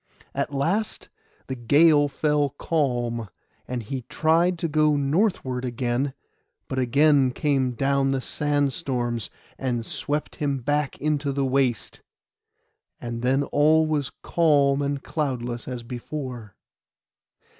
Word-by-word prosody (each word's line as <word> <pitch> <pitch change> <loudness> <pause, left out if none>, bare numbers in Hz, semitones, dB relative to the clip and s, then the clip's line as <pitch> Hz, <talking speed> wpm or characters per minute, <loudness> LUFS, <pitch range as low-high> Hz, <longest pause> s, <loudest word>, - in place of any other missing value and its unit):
At - - -2
last 170 +10 -1 0.4
the 130 - -4
gale 145 +5 +4
fell 150 0 +1
calm, 120 -8 -1 0.4
and 125 -2 -3
he 130 +4 -4
tried 170 +3 +2
to 165 - -1
go 155 -1 +3
northward 140 - 0
again; 125 +2 -1 0.5
but 130 - -2
again 140 +2 +4
came 130 -1 0
down 135 +2 +1
the 135 0 +1
sandstorms, 135 -5 -1 0.3
and 120 -3 -1
swept 150 +5 -3
him 140 -2 0
back 145 +3 -1
into 145 -1 0
the 140 0 0
waste, 130 -3 0 1.0
and 120 -1 -5
then 135 +3 +2
all 155 +3 +3
was 150 -4 -1
calm 145 -4 +3
and 140 -1 -2
cloudless 125 -6 -3
as 125 -2 -5
before. 125 -3 -6
140 Hz, 120 wpm, -25 LUFS, 125-150 Hz, 1.0 s, gale